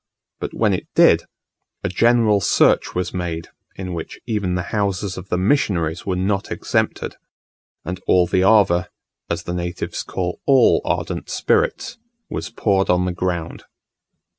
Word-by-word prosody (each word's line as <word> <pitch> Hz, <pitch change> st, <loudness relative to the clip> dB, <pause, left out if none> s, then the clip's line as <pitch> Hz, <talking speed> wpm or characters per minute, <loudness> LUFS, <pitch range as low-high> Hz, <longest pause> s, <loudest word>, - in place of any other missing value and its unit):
But -, -, -5 dB
when -, -, +2 dB
it -, -, -3 dB
did, -, -, +5 dB, 0.6 s
a -, -, 0 dB
general 115 Hz, 0 st, +3 dB
search -, -, +3 dB
was 90 Hz, 0 st, -2 dB
made, 85 Hz, -3 st, -4 dB, 0.3 s
in 90 Hz, -1 st, -5 dB
which 85 Hz, -2 st, -6 dB
even 105 Hz, -6 st, -1 dB
the 90 Hz, -, -1 dB
houses 100 Hz, -2 st, -1 dB
of 95 Hz, +1 st, -9 dB
the 90 Hz, -, 0 dB
missionaries 90 Hz, -, 0 dB
were 95 Hz, -, 0 dB
not 95 Hz, +2 st, -1 dB
exempted, -, -, -1 dB, 0.7 s
and 90 Hz, +1 st, -4 dB
all 90 Hz, -1 st, +5 dB
the 90 Hz, -, +1 dB
ava 95 Hz, -3 st, +4 dB, 0.4 s
(as 85 Hz, +1 st, -2 dB
the 85 Hz, -, -4 dB
natives 90 Hz, 0 st, -4 dB
call 90 Hz, -1 st, -4 dB
all 135 Hz, -2 st, +5 dB
ardent -, -, -2 dB
spirits) 425 Hz, -, 0 dB, 0.3 s
was -, -, -4 dB
poured 95 Hz, -2 st, +1 dB
on 90 Hz, 0 st, +3 dB
the 90 Hz, -, 0 dB
ground. 85 Hz, -2 st, -3 dB
90 Hz, 150 wpm, -21 LUFS, 90-105 Hz, 0.7 s, did